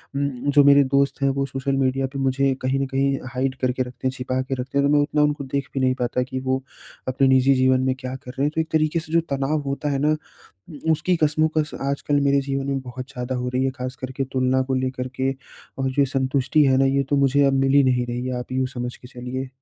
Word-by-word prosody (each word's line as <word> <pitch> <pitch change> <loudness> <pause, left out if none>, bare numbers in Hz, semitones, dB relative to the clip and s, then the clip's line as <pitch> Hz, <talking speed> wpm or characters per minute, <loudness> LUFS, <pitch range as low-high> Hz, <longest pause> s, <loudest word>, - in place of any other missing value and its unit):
उम, 140 0 +1 0.2
जो 145 0 +6
मेरे 140 0 +7
दोस्त 140 0 +2
हैं 140 - +3
वो 135 - +1
सोशल 135 0 -2
मीडिया 135 0 +1
पे 140 - -4
मुझे 135 0 +1
कहीं 130 +1 0
न 135 - 0
कहीं 135 +1 0 0.2
हाइड 130 +1 -1
करके 130 0 +1
रखते 125 0 -5
हैं, 130 - 0
छिपा 130 0 -2
के 135 +1 -3
रखते 130 +2 -3
हैं, 140 - +3
तो 145 - +2
मैं 145 - +5
उतना 150 +1 +1
उनको 150 -1 0
देख 135 0 -3
भी 135 - -1
नहीं 130 0 +2
पाता 125 +1 0
कि 130 0 -5
वो 130 0 -1 0.5
अपने 135 +1 +2
निजी 130 +1 +5
जीवन 130 0 +3
में 130 - +2
क्या 130 0 -5
कर 125 -1 -9
रहे 135 +1 -3
हैं। 150 - +1
तो 160 - +2
एक 160 - -5
तरीके 155 +1 +2
से 155 0 -9
जो 170 - +4
तनाव 140 +2 0
होता 140 +2 -2
है 135 - 0
ना, 150 +2 +2 0.7
उ - - +5
उसकी 165 +4 +1
कशमकश 155 0 +1
आजकल 140 +1 0
मेरे 140 0 +3
जीवन 135 0 -3
में 135 -1 -1
बहुत 130 0 -8
ज़्यादा 125 +1 -4
हो 125 0 -2
रही 130 - +1
है। 135 - +1
ख़ास 130 +1 -4
कर 130 0 -6
के 135 - 0
तुलना 130 0 +2
को 130 - +1
लेकर 130 0 -2
के 130 0 +1 0.5
और 135 0 0
जो 140 +1 +2
संतुष्टि 135 +2 +2
है 135 -1 +4
ना, 135 - +4
ये 140 +1 +2
तो 145 - +3
मुझे 140 +1 +3
अब 135 - +3
मिल 135 0 +2
ही 140 - +7
नहीं 125 -1 +2
रही 120 +1 -3
है, 130 -1 -2
आप 125 +1 -7
यूँ 130 0 +1
समझ 120 0 -4
के 125 - -14
चलिए। 130 +1 -5
135 Hz, 265 wpm, -23 LUFS, 130-140 Hz, 0.7 s, मेरे